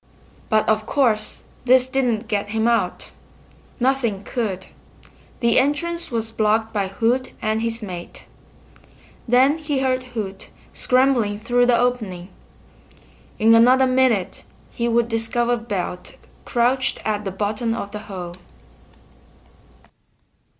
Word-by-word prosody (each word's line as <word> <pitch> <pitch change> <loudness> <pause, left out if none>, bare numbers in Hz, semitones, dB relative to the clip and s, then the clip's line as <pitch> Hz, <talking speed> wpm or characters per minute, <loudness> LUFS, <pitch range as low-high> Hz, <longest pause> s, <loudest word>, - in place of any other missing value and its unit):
But 215 -1 +2
of 215 0 +1
course 225 -7 0 0.2
this 255 0 +5
didn't 245 -4 0
get 205 -1 -2
him 220 +1 0
out. 235 -1 0 0.7
Nothing 240 -6 0
could! 200 -7 -3 0.8
The 235 -1 +4
entrance 315 +5 -1
was 225 -2 -2
blocked 220 0 +1
by 200 -3 0
Hoot 235 +6 0
and 220 0 -1
his 230 0 -2
mate. 180 -4 -8 1.0
Then 260 +6 +4
he 295 -3 -2
heard 260 -1 +1 0.2
Hoot 195 -3 -5 0.2
scrambling 250 -5 +2
through 245 +3 +2
the 245 -1 +4
opening. 215 -8 -1 1.1
In 225 +1 +5
another 250 +3 +6
minute 255 -7 +1 0.3
he 235 - -2
would 235 0 +2
discover 235 +1 0
Belt 200 -6 -5 0.3
crouched 255 +2 +1
at 210 -1 -1
the 195 - -3
bottom 210 +4 -2
of 200 -3 -5
the 210 - -5
hole. 175 -3 -6
230 Hz, 120 wpm, -22 LUFS, 210-255 Hz, 1.1 s, another